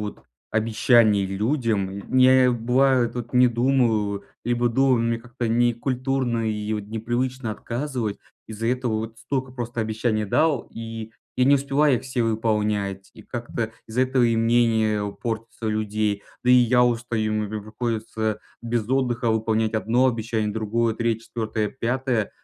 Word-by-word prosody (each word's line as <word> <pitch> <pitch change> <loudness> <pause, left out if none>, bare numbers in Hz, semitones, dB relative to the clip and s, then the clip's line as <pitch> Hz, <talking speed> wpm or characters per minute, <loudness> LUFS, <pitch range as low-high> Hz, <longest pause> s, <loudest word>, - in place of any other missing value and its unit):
вот 105 0 -6 0.3
обещаний 110 -2 +3
людям. 105 0 0 0.3
Ня 130 0 +6
бывает, 125 +1 +2
вот 120 -1 -5
не 125 0 +6
думаю, 115 -5 +1 0.2
либо 120 +1 +1
думаю, 130 0 +3
мне 115 0 0
как-то 120 0 -5
некультурно 120 0 0
и 105 0 -2
вот 105 -1 -3
непривычно 120 +3 -2
отказывать. 120 -1 -3 0.3
Из-за 110 +1 -3
этого 125 -1 0
вот 110 +1 -4
столько 130 0 -3
просто 120 -2 -4
обещаний 110 0 -1
дал, 145 +5 +1
и 115 -1 -7 0.3
я 125 - +3
не 140 +2 +6
успеваю 140 0 +2
их - - -6
все 130 -2 -2
выполнять, 105 -3 -1
и - - -13
как-то 115 -2 -4 0.2
из-за 125 +4 +1
этого 130 0 +2
и 115 -1 +3
мнение 115 -2 +2
у 100 - -3
портится 115 0 -5
людей. 105 -1 -1 0.2
Да, 125 - +4
и - - +8
я 125 0 +5
устаю, 115 -2 0
м_ 105 -1 -1
прям 110 -1 -4
приходится 110 -1 -3 0.2
без 115 -1 -2
отдыха 125 -3 +1
выполнять 110 0 0
1 115 +4 +2
обещание, 110 -3 -1
другое, 110 +1 0
3, 115 0 -1
4, 110 -2 -2
5. 125 -3 -1
115 Hz, 150 wpm, -24 LUFS, 110-125 Hz, 0.3 s, и